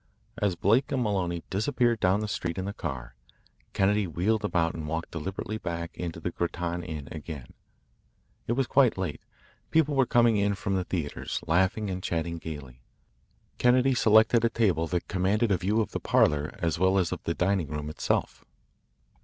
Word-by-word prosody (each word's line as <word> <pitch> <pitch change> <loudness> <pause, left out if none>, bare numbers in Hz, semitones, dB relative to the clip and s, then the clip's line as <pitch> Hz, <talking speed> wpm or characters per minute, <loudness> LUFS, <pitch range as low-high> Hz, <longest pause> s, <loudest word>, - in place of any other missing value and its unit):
As 100 -5 +1
Blake 115 +10 +2
and 130 -2 +1
Maloney 90 -5 -1
disappeared 115 +3 +1
down 95 +2 +2
the 105 - -2
street 90 -4 -3
in 95 - -2
the 100 - -4
car, 60 -7 -5 0.6
Kennedy 100 0 +2
wheeled 100 +7 0
about 85 -5 +1
and 80 -2 -6
walked 80 +2 -3
deliberately 95 +6 -4
back 85 -2 -5
into 85 -2 -5
the 85 +2 -3
Grattan 85 0 -2
Inn 80 -4 -6
again. 75 -4 -8 0.9
It 120 - +1
was 135 +2 +1
quite 130 -4 +3
late. 95 -5 -3 0.5
People 155 -2 +3
were 135 -3 +3
coming 120 -2 +4
in 100 0 +1
from 100 0 -3
the 95 -1 -1
theatres, 80 -6 -3
laughing 95 +5 +1
and 90 0 -4
chatting 85 -1 -2
gaily. 70 -6 -8 0.8
Kennedy 125 +2 +4
selected 110 0 +5
a 115 - +4
table 95 -8 +1
that 90 +1 -2
commanded 100 +4 +1
a 95 - +3
view 105 +6 +1
of 105 - -3
the - - -3
parlour 75 0 +2
as 85 -2 -1
well 95 +1 +3
as 90 -3 +1
of - - -4
the 85 - -1
dining 95 -3 +1
room 75 0 -4
itself. 75 - -2
95 Hz, 180 wpm, -28 LUFS, 85-110 Hz, 0.9 s, selected